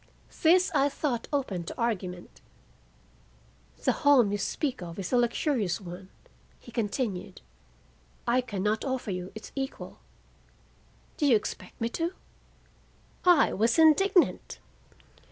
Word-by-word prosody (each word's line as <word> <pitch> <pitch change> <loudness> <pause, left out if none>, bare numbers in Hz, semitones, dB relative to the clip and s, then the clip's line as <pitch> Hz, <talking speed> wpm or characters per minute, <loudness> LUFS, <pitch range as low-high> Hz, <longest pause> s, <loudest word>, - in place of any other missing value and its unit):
This 360 +3 +5
I 280 -1 +3
thought 265 -5 -2
open 235 - -1
to - - -7
argument. 185 -6 -3 1.4
"The - - +3
home 260 -8 +4
you 205 - -1
speak 265 - -2
of 170 -1 -7
is 195 +4 -4
a - - +5
luxurious 240 - +1
one," 185 0 -9 0.5
he 240 - -14
continued. 205 -4 -3 0.8
"I 245 +2 +2
can 205 -6 -5
not 215 +1 0
offer 260 -6 -2
you 180 0 -5
its 220 - -9
equal 270 -1 -5 1.2
Do 295 - +2
you 250 - +6
expect 210 - -4
me 230 - 0
to?" 335 +8 -3 1.1
I 350 -5 +5
was 225 +4 +2
indignant. 345 +4 +4
235 Hz, 125 wpm, -28 LUFS, 200-285 Hz, 1.4 s, you